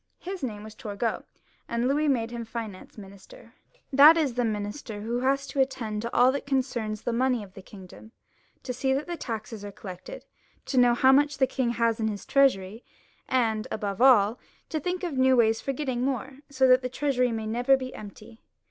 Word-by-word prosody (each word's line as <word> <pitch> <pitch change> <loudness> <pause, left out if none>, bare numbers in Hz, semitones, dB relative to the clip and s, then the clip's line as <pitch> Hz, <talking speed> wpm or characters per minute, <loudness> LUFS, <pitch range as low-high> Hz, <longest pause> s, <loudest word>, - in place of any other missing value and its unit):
His 370 0 -7
name 215 -6 -5
was. 215 0 -10
Turgot, 215 +1 -4 0.4
and 235 +1 0
Louis 295 +3 +1
made 235 -5 0
him 235 -1 -5
Finance 225 -4 -8
Minister, 200 - -14 0.4
that 295 +5 +8
is, 295 -6 +1
the 245 +1 0
minister 210 0 -4
who 235 +3 -2
has 275 +2 +1
to 275 - -5
attend 230 -6 -2
to 235 +1 -4
all 250 +1 +5
that 280 +1 -5
concerns 240 -6 -2
the 240 - -1
money 250 -1 +1
of 190 -2 -14
the 195 - -11
kingdom, 190 +3 -14 0.5
to 250 - -4
see 265 +2 0
that 285 +2 -2
the 345 - -4
taxes 225 -6 -6
are 205 - -7
collected, 195 - -10 0.4
to 260 - +1
know 245 -1 +5
how 260 +2 +5
much 290 +1 +3
the 265 - +4
king 260 -1 -1
has 230 -1 0
in 220 - 0
his 205 -2 -5
treasury, 225 -6 +2 0.5
and 225 -4 0
above 200 -1 -4
all 235 -4 +5 0.3
to 315 - -2
think 360 +4 -3
of 310 -7 -2
new 260 0 +5
ways 225 -1 +3
for 275 - -2
getting 260 -3 -3
more, 265 +1 -3
so 265 -2 +2
that 255 0 +5
the 250 - -3
treasury 250 -2 0
may 220 -1 -3
never.be 255 +3 +1
empty. 215 +2 -12
245 Hz, 200 wpm, -26 LUFS, 220-270 Hz, 0.5 s, that